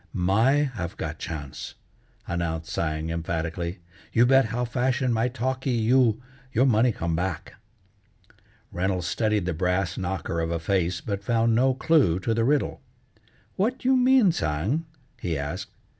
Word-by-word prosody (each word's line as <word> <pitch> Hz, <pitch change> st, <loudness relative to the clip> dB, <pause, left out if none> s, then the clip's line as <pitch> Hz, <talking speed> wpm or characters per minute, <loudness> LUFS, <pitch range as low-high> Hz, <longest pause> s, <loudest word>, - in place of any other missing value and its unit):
"My 100 Hz, +9 st, +3 dB, 0.2 s
have 90 Hz, -6 st, -5 dB
got 80 Hz, 0 st, -5 dB
chance," 75 Hz, -5 st, -6 dB, 0.5 s
announced 85 Hz, -1 st, -3 dB
Tsang 80 Hz, 0 st, -2 dB
emphatically, 85 Hz, +1 st, -3 dB, 0.3 s
"you 120 Hz, -, +4 dB
bet 135 Hz, 0 st, +5 dB
how 120 Hz, +3 st, -2 dB
fashion 125 Hz, +1 st, 0 dB
my 115 Hz, +2 st, +1 dB
talkee 130 Hz, +2 st, -2 dB
you, 115 Hz, 0 st, +3 dB, 0.3 s
your 130 Hz, +3 st, +3 dB
money 120 Hz, -1 st, +4 dB
come 85 Hz, -5 st, -2 dB
back." 90 Hz, +3 st, -3 dB, 1.2 s
Reynolds 90 Hz, 0 st, -1 dB
studied 105 Hz, 0 st, 0 dB
the 90 Hz, -, -1 dB
brass 90 Hz, +2 st, -1 dB
knocker 90 Hz, -3 st, -3 dB
of 80 Hz, 0 st, -1 dB
a 85 Hz, -, -1 dB
face, 90 Hz, +1 st, 0 dB
but 100 Hz, -1 st, -4 dB
found 115 Hz, +1 st, +2 dB
no 130 Hz, +3 st, +3 dB
clue 135 Hz, -, +3 dB
to 115 Hz, -, 0 dB
the 115 Hz, 0 st, +1 dB
riddle. 145 Hz, +4 st, +1 dB, 0.8 s
"What 235 Hz, +7 st, -1 dB
you 260 Hz, +1 st, +5 dB
mean, 255 Hz, -5 st, +5 dB
Tsang?" 100 Hz, -, -1 dB, 0.3 s
he 85 Hz, -4 st, -2 dB
asked. 70 Hz, 0 st, -4 dB
100 Hz, 145 wpm, -25 LUFS, 85-125 Hz, 1.2 s, bet